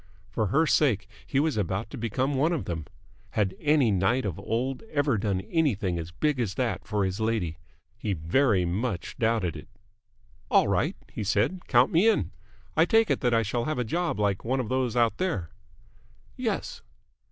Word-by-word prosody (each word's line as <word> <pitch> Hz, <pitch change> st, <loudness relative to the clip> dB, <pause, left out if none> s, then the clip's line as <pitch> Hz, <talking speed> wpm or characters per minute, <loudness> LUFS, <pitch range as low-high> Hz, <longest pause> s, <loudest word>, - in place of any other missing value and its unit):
And -, -, -29 dB
for 110 Hz, -, 0 dB
her 155 Hz, +11 st, +3 dB
sake 130 Hz, -10 st, +2 dB, 0.2 s
he 135 Hz, -, +1 dB
was 155 Hz, -4 st, +1 dB
about 95 Hz, +2 st, -2 dB
to -, -, -6 dB
become 125 Hz, +5 st, -1 dB
one 150 Hz, +6 st, +2 dB
of 160 Hz, -, -2 dB
them! 80 Hz, -3 st, -4 dB, 0.5 s
Had 100 Hz, -3 st, +1 dB
any 145 Hz, -6 st, +3 dB
knight 100 Hz, +6 st, +1 dB
of 95 Hz, -3 st, -3 dB
old 125 Hz, +6 st, -2 dB
ever 145 Hz, -4 st, +1 dB
done 100 Hz, -2 st, -1 dB
anything 105 Hz, -, 0 dB
as 80 Hz, 0 st, -6 dB
big 140 Hz, -, -1 dB
as 100 Hz, -6 st, -1 dB
that 120 Hz, -7 st, -2 dB
for 105 Hz, -3 st, 0 dB
his 95 Hz, +2 st, -3 dB
lady? 110 Hz, -8 st, -1 dB, 0.4 s
He 105 Hz, -3 st, -1 dB
very 95 Hz, -, +2 dB
much 95 Hz, +1 st, -2 dB
doubted 110 Hz, -7 st, +1 dB
it. -, -, -9 dB, 0.8 s
"All -, -, +4 dB
right," -, -, +1 dB, 0.2 s
he -, -, -4 dB
said. 115 Hz, -, 0 dB
"Count 125 Hz, 0 st, +4 dB
me 185 Hz, +8 st, +5 dB
in. 225 Hz, -, +1 dB, 0.4 s
I -, -, +5 dB
take 225 Hz, -1 st, +3 dB
it -, -, +1 dB
that 120 Hz, -2 st, +2 dB
I 115 Hz, -, +3 dB
shall 115 Hz, +3 st, -2 dB
have 155 Hz, -2 st, -2 dB
a 125 Hz, -, +1 dB
job 170 Hz, +4 st, -1 dB
like 100 Hz, -2 st, 0 dB
one 130 Hz, +3 st, 0 dB
of 120 Hz, -4 st, -3 dB
those 130 Hz, -2 st, 0 dB
out 120 Hz, -2 st, +2 dB
there?" 105 Hz, -, -1 dB, 0.8 s
"Yes." -, -, -3 dB
115 Hz, 190 wpm, -27 LUFS, 95-135 Hz, 0.8 s, me